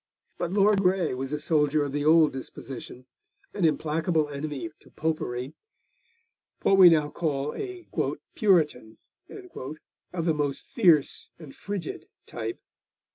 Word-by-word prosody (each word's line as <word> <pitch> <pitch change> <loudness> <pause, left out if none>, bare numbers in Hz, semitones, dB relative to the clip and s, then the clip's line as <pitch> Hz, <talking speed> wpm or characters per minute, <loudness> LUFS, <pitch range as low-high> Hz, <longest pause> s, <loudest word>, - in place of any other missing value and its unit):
But 175 -1 -2
Lord 200 0 +4
Grey 180 -4 +2
was 135 +2 -4
a 150 - -1
soldier 150 -1 +2
of 140 - -3
the 145 +1 -2
old 155 0 +5
disposition, 130 -1 -8 0.5
an 195 -4 0
implacable 160 0 +1
enemy 145 +2 -5
to - - -20
Popery, 140 -4 -3 1.1
what 195 - +4
we 180 -2 +11
now 150 -3 +2
call 150 -3 -2
a 370 -3 -7 0.5
'Puritan' 155 - +2 0.3
of 170 - -8
the 165 - +3
most 145 -2 -2
fierce 170 - +2
and 155 -5 -12
frigid 200 -5 -6 0.2
type. 115 -1 -5
155 Hz, 130 wpm, -27 LUFS, 145-180 Hz, 1.1 s, we